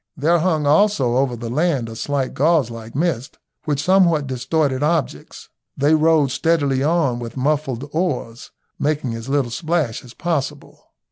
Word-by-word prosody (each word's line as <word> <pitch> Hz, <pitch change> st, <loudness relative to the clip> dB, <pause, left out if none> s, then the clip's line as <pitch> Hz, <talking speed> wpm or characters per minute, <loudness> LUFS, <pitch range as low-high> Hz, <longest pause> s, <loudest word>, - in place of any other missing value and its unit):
There 165 Hz, +5 st, +2 dB
hung 160 Hz, -3 st, +1 dB
also 150 Hz, -, +3 dB
over 130 Hz, -2 st, +1 dB
the 115 Hz, 0 st, -6 dB
land 145 Hz, -4 st, 0 dB
a 115 Hz, -, -8 dB
slight 135 Hz, +2 st, -2 dB
gauze 150 Hz, -4 st, +2 dB
like 115 Hz, 0 st, -9 dB
mist, 140 Hz, -5 st, -2 dB, 0.3 s
which 145 Hz, -2 st, -1 dB
somewhat 175 Hz, -5 st, +3 dB
distorted 130 Hz, +1 st, -1 dB
objects. 150 Hz, -, -2 dB, 0.3 s
They 145 Hz, +3 st, +3 dB
rowed 155 Hz, -3 st, +3 dB
steadily 145 Hz, -3 st, +1 dB
on 145 Hz, -5 st, +1 dB
with 120 Hz, +1 st, -7 dB
muffled 140 Hz, -1 st, -1 dB
oars, 155 Hz, -9 st, -3 dB, 0.3 s
making 145 Hz, -5 st, -1 dB
as 115 Hz, +3 st, -7 dB
little 135 Hz, -4 st, 0 dB
splash 155 Hz, -2 st, -1 dB
as 125 Hz, -1 st, -14 dB
possible. 150 Hz, -4 st, -4 dB
145 Hz, 150 wpm, -20 LUFS, 125-160 Hz, 0.3 s, also